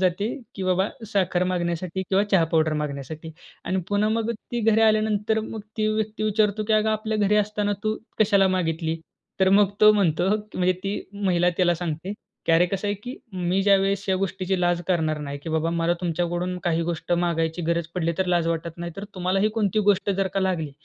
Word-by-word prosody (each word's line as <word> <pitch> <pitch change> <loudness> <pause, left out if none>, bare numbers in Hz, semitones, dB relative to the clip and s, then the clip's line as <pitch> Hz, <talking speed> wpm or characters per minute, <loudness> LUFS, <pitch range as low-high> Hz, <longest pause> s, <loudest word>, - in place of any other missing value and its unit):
जाते 185 +3 +1 0.3
की 195 - -5
बाबा 185 +2 +1 0.2
साखर 185 -2 +1
मागण्यासाठी 175 +1 -2
किंवा 195 +1 +3
चहा 180 -4 +5
पावडर 155 -1 +3
मागण्यासाठी. 150 +2 -6 0.3
आणि 190 0 0
पुन्हा 205 +1 +2
मग 230 0 -1
ती 235 +2 -5
घरी 225 0 +3
आल्यानंतर 215 0 +2
मग 220 0 -6 0.2
ती 215 -1 +1
व्यक्ती 215 0 -2
विचारतो 215 0 +1
की 220 - 0
"अगं 220 - +1
आपल्या 215 0 -1
घरी 210 0 +3
असताना 210 0 -1
तू 215 0 0 0.2
कशाला 200 -3 +4
मागितली?" 165 -1 -2 0.4
तर 190 - +5
मग 205 -2 +4
तो 215 0 +8
म्हणतो 185 -4 +2 0.3
म्हणजे 185 0 +2
ती 200 +1 -2
महिला 185 -3 +1
त्याला 175 -2 +3
सांगते 165 +4 -3 0.3
की - - +3
"अरे, 165 +2 +5
कसं 195 +1 -2
आहे 205 - 0
की 250 +3 -6 0.2
मी 180 +1 0
ज्यावेळेस 195 0 +3
ह्या 190 - +2
गोष्टीची 190 0 -1
लाज 175 -1 +2
करणार 160 -4 +1
नाही 140 -1 -5
की - - -6
बाबा 160 +1 0
मला 170 0 +1
तुमच्याकडून 175 +1 -1
काही 170 -1 +1
गोष्ट 170 +1 -3
मागायची 170 -1 0
गरज 170 -1 0
पडली 170 -2 0
तर 190 - +1
लाज 175 -2 +2
वाटत 165 0 -3
नाही, 170 0 -5
तर 200 - -5
तुम्हालाही 190 +3 +1
कोणती 215 -2 0
गोष्ट 200 0 +3
जर 195 0 0
का 195 - +1
लागली, 175 -6 -1
185 Hz, 195 wpm, -24 LUFS, 170-205 Hz, 0.4 s, तो